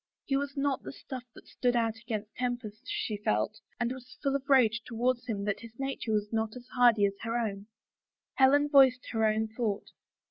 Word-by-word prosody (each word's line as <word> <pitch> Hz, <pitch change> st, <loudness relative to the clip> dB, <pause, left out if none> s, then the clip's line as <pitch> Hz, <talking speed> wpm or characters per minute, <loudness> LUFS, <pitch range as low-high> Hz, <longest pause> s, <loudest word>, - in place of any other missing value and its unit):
His 275 Hz, -1 st, +1 dB
was 285 Hz, 0 st, -4 dB
not 275 Hz, -1 st, 0 dB
the -, -, -7 dB
stuff 260 Hz, -2 st, -8 dB
that -, -, -14 dB
stood 245 Hz, -1 st, 0 dB
out 225 Hz, -2 st, +1 dB
against 220 Hz, -2 st, -5 dB
tempest', 245 Hz, -2 st, -4 dB
she 215 Hz, -, -2 dB
felt, 110 Hz, -, 0 dB, 0.2 s
and 240 Hz, 0 st, 0 dB
was 255 Hz, 0 st, -9 dB
full 275 Hz, 0 st, +1 dB
of 275 Hz, 0 st, -4 dB
rage 230 Hz, -5 st, +5 dB
towards 245 Hz, +1 st, -1 dB
him 205 Hz, -4 st, -2 dB
that 205 Hz, -1 st, -1 dB
his 230 Hz, 0 st, -12 dB
nature 270 Hz, -4 st, -3 dB
was 210 Hz, 0 st, 0 dB
not 220 Hz, 0 st, -1 dB
as 250 Hz, -1 st, -9 dB
hardy 240 Hz, -5 st, +5 dB
as 200 Hz, -, 0 dB
her 230 Hz, +1 st, -1 dB
own. 205 Hz, -3 st, -3 dB, 0.7 s
Helen 285 Hz, +2 st, +5 dB
voiced 265 Hz, -4 st, +5 dB
her 225 Hz, -2 st, 0 dB
own 215 Hz, +1 st, +1 dB
thought. 220 Hz, -3 st, -3 dB
240 Hz, 200 wpm, -30 LUFS, 215-260 Hz, 0.7 s, rage